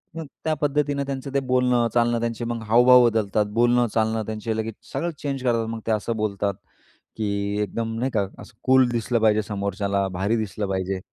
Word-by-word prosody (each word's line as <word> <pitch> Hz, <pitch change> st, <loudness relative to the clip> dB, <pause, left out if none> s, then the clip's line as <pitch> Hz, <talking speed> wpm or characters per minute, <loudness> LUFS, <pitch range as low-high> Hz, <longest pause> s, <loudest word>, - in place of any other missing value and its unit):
मग 165 Hz, -, -5 dB, 0.2 s
त्या 160 Hz, -, +2 dB
पद्धतीनं 145 Hz, -1 st, 0 dB
त्यांचं 135 Hz, 0 st, -5 dB
ते 140 Hz, -, +3 dB
बोलणं, 125 Hz, -2 st, +2 dB
चालणं, 120 Hz, 0 st, +2 dB
त्यांचे 115 Hz, 0 st, -2 dB
मग 115 Hz, -1 st, -3 dB
हावभाव 125 Hz, +2 st, +7 dB
बदलतात, 105 Hz, -1 st, 0 dB
बोलणं, 120 Hz, +1 st, +3 dB
चालणं 110 Hz, 0 st, +1 dB
त्यांचे 110 Hz, +1 st, -3 dB
लगेच 110 Hz, -1 st, -3 dB, 0.2 s
सगळं 170 Hz, 0 st, -1 dB
चेंज 135 Hz, -3 st, -3 dB
करतात. 115 Hz, -2 st, +1 dB
मग 115 Hz, 0 st, -4 dB
ते -, -, +2 dB
असं 110 Hz, +2 st, -1 dB
बोलतात, 100 Hz, -1 st, -1 dB, 0.6 s
की 105 Hz, -2 st, -1 dB, 0.3 s
एकदम 115 Hz, +2 st, -3 dB
नाही 130 Hz, +1 st, -1 dB
का 100 Hz, -4 st, 0 dB
असं -, -, -12 dB
कूल 130 Hz, -1 st, +5 dB
दिसलं 120 Hz, 0 st, 0 dB
पाहिजे. 110 Hz, -1 st, +4 dB
समोरच्याला 100 Hz, -1 st, -1 dB
भारी 105 Hz, +4 st, +1 dB
दिसलं 105 Hz, -1 st, -3 dB
पाहिजे. 95 Hz, 0 st, -2 dB
115 Hz, 185 wpm, -24 LUFS, 105-125 Hz, 0.6 s, हावभाव